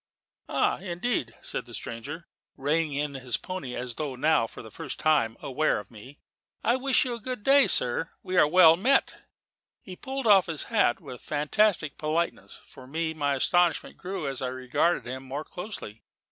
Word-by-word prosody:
"Ah, - - +1
indeed!" 175 - -2
said - - -5
the 120 - -6
stranger, 145 +9 -6 0.3
reining 150 +2 0
in 145 0 -1
his 130 -3 -3
pony 185 -10 -6
as 125 -1 -4
though 145 -4 -3
now 135 -3 +2
for - - -11
the 110 - -11
first - - -6
time 145 -8 +2
aware 150 +4 +1
of 105 - -8
me: 125 +6 -13 0.5
"I 235 - +3
wish 265 0 +2
you 250 - -2
a 235 - -5
very 255 +3 -4
good 210 - -22
day, 275 0 +6
sir. 125 +7 +1
We 185 - -4
are 180 - +6
well 165 0 +7
met." 255 +10 +2 0.7
He 185 - -10
pulled 270 +5 -5
off 195 -4 +6
his 160 -3 -3
hat 205 - +3
with - - -9
a - - -23
fantastic 155 +2 +1
politeness. 160 +3 -2
For 130 - -14
me, 160 +3 -2
my 145 -3 0
astonishment 175 +5 +2
grew 180 -4 -4
as 135 -1 -3
I 130 - -1
regarded 130 +7 0
him 130 +2 -5
more 135 +3 -5
closely. 175 - -8
155 Hz, 190 wpm, -27 LUFS, 130-185 Hz, 0.7 s, well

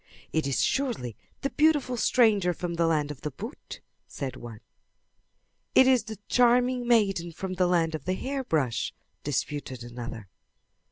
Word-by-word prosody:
"It 160 -3 +1
is 135 - +1
surely 235 - -1 0.3
the 275 - -1
beautiful 295 -5 +3
stranger 215 -7 +3
from 175 +1 -3
the 170 0 +1
land 150 -3 +1
of 145 - -9
the 150 - -3
boot," 220 - -9 0.3
said 130 -3 -5
one. 115 -3 -10 1.1
"It 260 - +8
is 255 -4 +4
the 220 -1 -7
charming 245 0 +3
maiden 195 -7 +2
from 185 +3 -5
the 180 -1 +2
land 165 -2 +2
of 155 -3 -5
the 185 +1 0
hairbrush," 185 - -1 0.3
disputed 140 -3 -3
another. 120 -3 -7
180 Hz, 150 wpm, -27 LUFS, -, 1.1 s, It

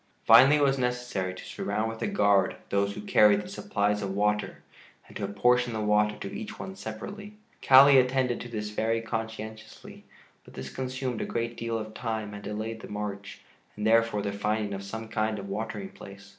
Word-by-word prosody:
Finally 130 +6 +8
it 150 - +2
was 135 -1 +2
necessary 125 -6 -2
to 95 - -10
surround 110 +1 -2
with 115 0 -6
a - - 0
guard 100 - +3
those 100 0 0
who - - -6
carried 105 0 +5
the - - -10
supplies 105 +1 -1
of 95 -1 -3
water 105 +1 -1 0.4
and - - -16
to - - -5
apportion 120 +4 +2
the 110 - -3
water 105 0 +2
to 100 - -7
each 220 0 -7
one 190 - -7
separately. 200 - -8 0.3
Kali 135 +1 +8
attended 125 -1 +1
to 120 - -7
this 105 -2 -4
very 115 +2 0
conscientiously, 110 -1 -7 0.4
but - - -16
this 65 0 -7
consumed 130 -2 -3
a - - -1
great 115 0 -3
deal 115 -1 -3
of 110 0 -6
time 110 -3 -4
and 105 - -8
delayed 110 +2 -5
the - - -10
march, 105 -1 -6 0.3
and 105 - -4
therefore 115 -2 +3
the 100 - -2
finding 105 0 -1
of 100 - -5
some 110 +3 -6
kind 110 -1 -1
of 100 -1 -7
watering 110 - -4
place. 100 - -13
110 Hz, 195 wpm, -28 LUFS, 105-125 Hz, 0.4 s, Finally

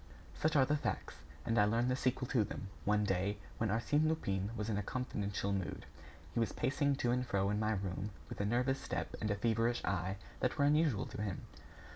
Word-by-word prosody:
Such 155 0 0
are 135 -2 +6
the 150 - +2
facts; - - -3 0.3
and 115 +1 +2
I 105 - +6
learned 115 +4 +2
the - - +3
sequel 130 -1 0
to 120 -5 +3
them, 100 0 -5 0.2
one 105 +1 +3
day, 100 +1 +1 0.2
when 110 - +1
Arsène 145 +8 +2
Lupin 100 -11 0
was 105 - -2
in 110 - 0
a - - 0
confidential 100 -4 -2
mood. 95 -3 -3 0.5
He - - 0
was 115 -4 +1
pacing 140 +1 +1
to 120 -3 +1
and 125 +1 +2
fro 100 -4 +1
in 105 - +1
my 110 0 +2
room, 95 0 -2 0.2
with - - -5
a - - +1
nervous 125 +5 +1
step - - -3
and 110 - 0
a 105 - +2
feverish 115 +3 +1
eye 95 0 -1 0.2
that 125 - 0
were 140 - +4
unusual 150 -6 +3
to - - -6
him. 100 -3 -2
110 Hz, 215 wpm, -35 LUFS, 100-125 Hz, 0.5 s, are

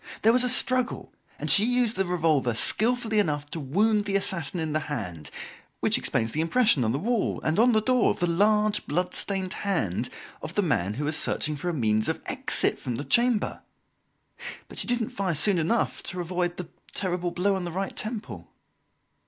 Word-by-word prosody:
There 225 +2 +5
was 250 0 +4
a 250 - +2
struggle, 255 0 +1 0.2
and - - -5
she 205 - +6
used 245 -1 +1
the 195 -1 -1
revolver 155 -9 +1
skilfully 225 - +3
enough 150 -7 -1
to 165 - -4
wound 205 +9 +1
the 200 -1 -2
assassin 180 -4 -1
in 160 -2 -3
the 155 - +1
hand 90 - -5 0.5
which - - +2
explains 115 -1 +1
the 155 - -1
impression 190 - +3
on 110 - 0
the 130 - -1
wall 230 +7 -1
and 155 +5 0
on 245 +2 +5
the 215 -2 +2
door 255 0 +3
of - - -1
the 175 - 0
large, 210 +4 +1
blood 180 +5 -1
stained 190 -2 0
hand 125 - -2 0.3
of 155 +3 -7
the 205 - +2
man 105 - 0
who 145 - -3
was 155 +1 -1
searching 155 0 0
for 160 +5 -4
a - - -2
means 110 -4 +1
of - - -2
exit - - +1
from 120 - -4
the 140 - -4
chamber. 240 +3 +1 1.1
But - - -7
she - - -2
didn't 240 -2 0
fire 190 -4 -2
soon 180 +4 +3
enough 185 +9 0
to 180 - -5
avoid 175 0 -2
the 180 -2 -7 0.3
terrible 180 -2 -1
blow 190 +3 0
on 190 - -3
the 175 - -5
right 190 +3 -4
temple." 215 0 -6
180 Hz, 200 wpm, -26 LUFS, 150-215 Hz, 1.1 s, she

